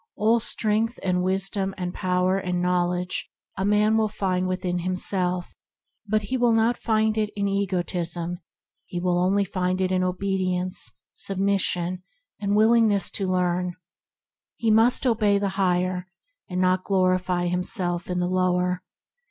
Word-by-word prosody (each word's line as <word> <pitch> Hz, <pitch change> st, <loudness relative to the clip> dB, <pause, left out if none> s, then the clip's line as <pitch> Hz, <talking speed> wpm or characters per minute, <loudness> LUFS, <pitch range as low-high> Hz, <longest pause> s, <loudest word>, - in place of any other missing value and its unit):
All 225 Hz, +3 st, +3 dB
strength 225 Hz, +1 st, 0 dB
and 180 Hz, -1 st, +1 dB
wisdom 190 Hz, +1 st, -1 dB
and 180 Hz, -1 st, -3 dB
power 185 Hz, +1 st, +1 dB
and 180 Hz, -2 st, -2 dB
knowledge 180 Hz, 0 st, 0 dB, 0.3 s
a 190 Hz, -, -2 dB
man 210 Hz, +2 st, +3 dB
will 220 Hz, -1 st, +2 dB
find 185 Hz, -3 st, -1 dB
within 185 Hz, -1 st, -1 dB
himself, 180 Hz, 0 st, -2 dB, 0.5 s
but 215 Hz, +1 st, +1 dB
he 255 Hz, +6 st, -2 dB
will 240 Hz, -2 st, +3 dB
not 225 Hz, +2 st, +3 dB
find 220 Hz, -1 st, +1 dB
it 210 Hz, -1 st, 0 dB
in 200 Hz, -1 st, 0 dB
egotism; 175 Hz, -3 st, -2 dB, 0.5 s
he 175 Hz, -, -4 dB
will 175 Hz, 0 st, +1 dB, 0.3 s
find 185 Hz, 0 st, -1 dB
it 185 Hz, 0 st, 0 dB
only -, -, +2 dB
in 185 Hz, -, +1 dB
obedience, 185 Hz, -1 st, -1 dB, 0.2 s
submission, 185 Hz, -2 st, 0 dB, 0.4 s
and 205 Hz, 0 st, 0 dB
willingness 220 Hz, -2 st, +4 dB
to 195 Hz, -, -2 dB
learn. 180 Hz, -1 st, 0 dB, 0.8 s
He 225 Hz, -1 st, +1 dB
must 225 Hz, +5 st, +4 dB
obey 215 Hz, -4 st, +3 dB
the 200 Hz, 0 st, 0 dB
Higher, 185 Hz, -1 st, 0 dB, 0.4 s
and 180 Hz, 0 st, -2 dB
not 185 Hz, 0 st, +2 dB
glorify 185 Hz, -2 st, +1 dB
himself 175 Hz, 0 st, -2 dB
in 180 Hz, -, -1 dB
the 175 Hz, -, 0 dB
lower. 180 Hz, 0 st, +1 dB
185 Hz, 145 wpm, -25 LUFS, 180-205 Hz, 0.8 s, willingness